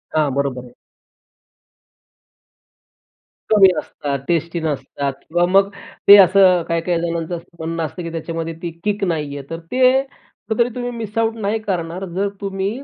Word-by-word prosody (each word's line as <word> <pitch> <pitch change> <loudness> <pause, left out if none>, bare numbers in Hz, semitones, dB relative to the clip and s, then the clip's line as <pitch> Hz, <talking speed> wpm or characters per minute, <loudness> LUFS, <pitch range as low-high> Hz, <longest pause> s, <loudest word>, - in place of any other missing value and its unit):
हां. 155 -2 +3
बरोबर 140 -2 -1
आहे. 125 -1 -15 2.8
कमी 205 -3 +8
असतात, 140 -1 -4
टेस्टी 170 0 0
नसतात 140 -2 -3
किंवा 175 +2 +2
मग 195 +2 +4 0.4
ते 200 - +12
असं 185 -2 +6
काही-काही 170 +1 0
जणांचं 170 0 -2
असं 170 - -16
म्हणणं 165 +1 -3
असतं, 170 +4 -7
की 165 - -5
त्याच्यामध्ये 165 0 -4
ती 170 - -4
किक 205 -1 -1
नाही 150 -6 -2
आहे. 140 - -8
तर 165 - -5
ते 255 +1 +4
कुठतरी 235 -3 -3
तुम्ही 245 -1 -3
मिस 225 -3 -7
आउट 225 0 +1
नाही 210 +2 0
करणार 185 -3 -3
जर 200 +2 0
तुम्ही 195 -1 -2
175 Hz, 150 wpm, -19 LUFS, 165-200 Hz, 2.8 s, ते